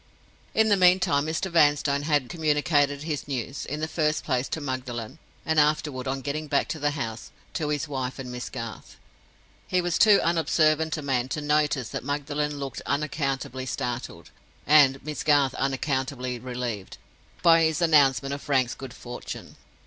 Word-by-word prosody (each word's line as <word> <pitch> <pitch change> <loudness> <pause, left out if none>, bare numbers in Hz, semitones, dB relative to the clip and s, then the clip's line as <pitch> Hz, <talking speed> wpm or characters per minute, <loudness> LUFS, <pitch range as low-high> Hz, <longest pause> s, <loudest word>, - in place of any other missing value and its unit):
In 220 0 +4
the 205 - +4
meantime, 180 -6 +4
Mr. 165 +4 -2
Vanstone 145 -3 +3
had 145 -3 +1
communicated 145 -2 +1
his 150 -3 -4
news—in 135 +2 -4
the 155 - -1
first 155 -1 0
place, 130 -2 0
to - - -3
Magdalen, 130 -1 -5 0.3
and 160 -1 +2
afterward, 150 -3 +1
on 135 +1 -2
getting 150 +3 -3
back 140 -1 +1
to 160 - -3
the 145 0 +1
house, 110 -5 -5 0.2
to 150 -3 -2
his 150 0 -1
wife 130 -3 -4
and 130 -2 -6
Miss 125 0 -5
Garth. 115 -2 -7 0.7
He 185 - +1
was 175 -1 0
too 210 -3 +7
unobservant 160 -1 +2
a 155 - -5
man 130 -2 0
to 150 - -2
notice 150 -4 +1
that - - -5
Magdalen 145 +1 -2
looked 135 -3 -5
unaccountably 135 -3 -2
startled, 125 - -4 0.3
and 140 -3 +5
Miss 150 -1 -4
Garth 145 -3 +3
unaccountably 130 -2 -2
relieved, 120 -5 -5 0.5
by 165 -1 +6
his 160 -1 +2
announcement 140 -4 +4
of 140 - -5
Frank's 130 -4 +1
good 135 -2 -9
fortune. 120 0 -8
145 Hz, 160 wpm, -26 LUFS, 130-155 Hz, 0.7 s, too